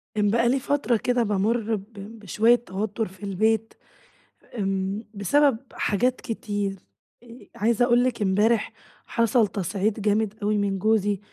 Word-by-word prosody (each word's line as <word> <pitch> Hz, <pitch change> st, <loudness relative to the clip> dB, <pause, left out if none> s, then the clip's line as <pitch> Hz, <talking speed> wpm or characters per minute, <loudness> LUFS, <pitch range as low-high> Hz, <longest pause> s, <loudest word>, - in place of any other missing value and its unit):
كان 205 Hz, -1 st, +2 dB
بقى 235 Hz, +2 st, +2 dB
لي 270 Hz, -, +2 dB
فترة 265 Hz, -3 st, 0 dB
كده 245 Hz, +2 st, +1 dB
بامرّ 220 Hz, +2 st, 0 dB
ب 210 Hz, +2 st, -10 dB, 0.3 s
بشوية 215 Hz, +4 st, +3 dB
توتر 215 Hz, -1 st, -3 dB
في 190 Hz, +1 st, -16 dB
البيت، 220 Hz, +3 st, 0 dB, 0.8 s
إمم 195 Hz, +1 st, -2 dB
بسبب 265 Hz, +6 st, +2 dB, 0.2 s
حاجات 245 Hz, +5 st, 0 dB
كتير، 205 Hz, -4 st, -3 dB, 0.5 s
آآ 240 Hz, +1 st, -14 dB
عايزة 230 Hz, +2 st, +2 dB
أقول 240 Hz, 0 st, +3 dB
لِك 255 Hz, -3 st, -1 dB
إمبارح 210 Hz, +4 st, +2 dB, 0.3 s
حصل 230 Hz, -1 st, +2 dB
تصعيد 200 Hz, +3 st, -2 dB
جامد 210 Hz, 0 st, +1 dB
أوي 210 Hz, +1 st, +1 dB
من 200 Hz, -1 st, -1 dB
جوزي، 205 Hz, -1 st, +1 dB
215 Hz, 140 wpm, -24 LUFS, 200-235 Hz, 0.8 s, بشوية